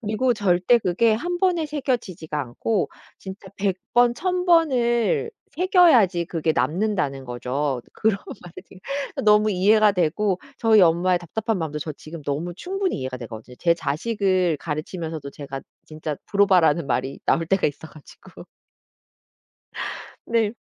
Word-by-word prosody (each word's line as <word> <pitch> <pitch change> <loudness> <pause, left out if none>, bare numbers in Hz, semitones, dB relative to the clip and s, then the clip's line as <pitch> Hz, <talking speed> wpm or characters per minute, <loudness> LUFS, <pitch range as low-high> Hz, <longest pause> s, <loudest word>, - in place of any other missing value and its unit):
그리고 235 +3 0
절대 195 +3 +3
그게 220 +3 +2
1 350 +10 -3
번에 350 -4 +1
새겨지지가 245 - -3
않고 145 - -2 0.3
진짜 190 +1 -9
100 195 -2 0 0.2
번 245 0 +5
1,000 360 +5 -1
번을 310 - +2 0.2
새겨야지 300 - +4
그게 165 -1 -1
남는다는 155 - -1
거죠. 125 +2 -2
그런 220 -2 +1 0.3
말을 175 -2 -12
듣 275 +9 -6
너무 210 0 +5
이해가 210 +2 +4
되고 185 +2 0 0.2
저희 225 -3 +5
엄마의 175 +1 +3
답답한 215 +5 -3
마음도 155 -3 -3
저 155 +1 -5
지금 155 +2 -10
너무 150 +5 -3
충분히 385 - -2
이해가 130 0 -5
되거든. 115 0 -9
제 170 -1 +3
자식을 180 +2 0
가르치면서도 160 -1 -5
제가 140 -1 -7 0.3
진짜 155 -1 -5
브로바라는 180 -6 +3
말이 130 +1 -2
나올 165 - +2
때가 195 +2 +2
있어 150 +2 -5
가지고 155 -2 -15 1.8
네. 225 -2 +1
185 Hz, 295 characters per minute, -23 LUFS, 155-230 Hz, 1.8 s, 번